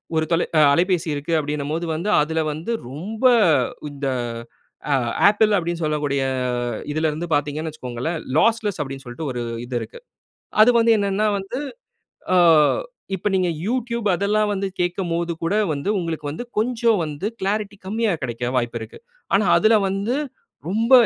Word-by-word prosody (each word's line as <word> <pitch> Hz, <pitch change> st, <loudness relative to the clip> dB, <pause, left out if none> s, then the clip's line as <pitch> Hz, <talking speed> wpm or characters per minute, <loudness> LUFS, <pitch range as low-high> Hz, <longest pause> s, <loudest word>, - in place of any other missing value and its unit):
ஒரு 160 Hz, 0 st, +2 dB
தொலை 165 Hz, -, +2 dB
அ -, -, +6 dB
அலைபேசி 175 Hz, +1 st, +1 dB
இருக்கு. 145 Hz, +3 st, -4 dB
அப்பிடினம்போது 150 Hz, +2 st, -2 dB
வந்து, 170 Hz, +7 st, -2 dB
அதில 160 Hz, +2 st, 0 dB
வந்து 160 Hz, +9 st, -5 dB, 0.2 s
ரொம்ப 195 Hz, -, -6 dB, 0.7 s
இந்த 145 Hz, -1 st, -6 dB, 0.9 s
அ -, -, +4 dB, 0.4 s
Apple 210 Hz, +1 st, +3 dB
அப்பிடின்னு 170 Hz, -1 st, -2 dB
சொல்லக்கூடிய 145 Hz, -3 st, 0 dB, 0.7 s
இதில 155 Hz, +1 st, +1 dB
இருந்து 160 Hz, +3 st, -4 dB
பார்த்தீங்கன்னு 150 Hz, +2 st, -2 dB
வச்சிக்கோங்களேன், 140 Hz, +3 st, -4 dB, 0.2 s
லாஸ்லெஸ் 220 Hz, -4 st, +2 dB
அப்பிடின்னு 135 Hz, -1 st, -6 dB
சொல்ட்டு 135 Hz, +5 st, -5 dB
ஒரு 125 Hz, -, -4 dB, 0.2 s
இது 125 Hz, 0 st, -6 dB
இருக்கு. 485 Hz, -, -9 dB, 0.6 s
அதுக்கு 235 Hz, +2 st, +6 dB
வந்து 230 Hz, 0 st, +5 dB
என்னன்னா 200 Hz, +1 st, +1 dB
வந்து, 195 Hz, +7 st, -5 dB, 0.8 s
ஆ -, -, +5 dB, 0.8 s
இப்ப 190 Hz, -, -1 dB
நீங்க 185 Hz, -2 st, +2 dB, 0.2 s
YouTube 235 Hz, -1 st, -2 dB
அதெல்லாம் 210 Hz, +3 st, +1 dB
வந்து 195 Hz, 0 st, -2 dB
கேட்கும்போதுகூட, 170 Hz, -1 st, -1 dB, 0.2 s
வந்து 140 Hz, +6 st, -4 dB
உங்களுக்கு 160 Hz, -3 st, -4 dB
வந்து 160 Hz, +11 st, -5 dB
கொஞ்சம் 230 Hz, -1 st, +2 dB
வந்து 150 Hz, +4 st, -5 dB
க்ளாரிட்டி 205 Hz, +1 st, -2 dB
கம்மியா 220 Hz, +1 st, 0 dB
கிடைக்க 120 Hz, +1 st, -3 dB
வாய்ப்பு 120 Hz, -1 st, -1 dB
இருக்கு. 110 Hz, -, -9 dB, 0.4 s
ஆனா 205 Hz, +2 st, +4 dB
அதுல 220 Hz, +1 st, +5 dB
வந்து, 200 Hz, +7 st, -1 dB, 0.5 s
ரொம்ப 225 Hz, +6 st, 0 dB
175 Hz, 140 wpm, -22 LUFS, 150-210 Hz, 0.9 s, அ